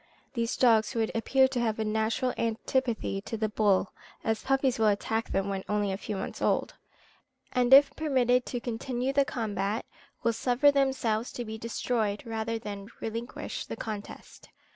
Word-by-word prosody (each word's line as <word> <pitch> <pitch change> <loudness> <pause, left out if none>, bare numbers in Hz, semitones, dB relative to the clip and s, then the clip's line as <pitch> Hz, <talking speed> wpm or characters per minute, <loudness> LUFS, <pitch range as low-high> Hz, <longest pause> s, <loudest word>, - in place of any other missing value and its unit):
These 235 -2 -1
dogs 225 -3 +4
would 225 -1 0
appear 265 +4 +3
to 260 -2 -2
have 225 -2 0
a 220 - -1
natural 220 +4 0
antipathy 230 -2 -1
to 225 - -5
the 215 0 0
bull, 205 -3 +2 0.3
as 220 -1 0
puppies 270 -2 +1
will 220 - +4
attack 220 +2 0
them 195 0 0
when 195 -1 -3
only 205 -1 +1
a 190 - -2
few 210 +1 -5
months 190 - -5
old, - - +1 0.8
and 250 0 +1
if 275 +2 +8
permitted 255 -5 +2
to 245 - -3
continue 245 +2 -2
the 280 0 +4
combat, 210 -3 -2 0.4
will 230 - +2
suffer 250 +5 +3
themselves 265 -5 +1
to 240 - -4
be 220 0 -6
destroyed 225 -2 -1
rather 225 0 -2
than 205 -2 -7
relinquish 230 +2 -5
the - - -5
contest. 210 -2 -8
225 Hz, 165 wpm, -29 LUFS, 215-250 Hz, 0.8 s, if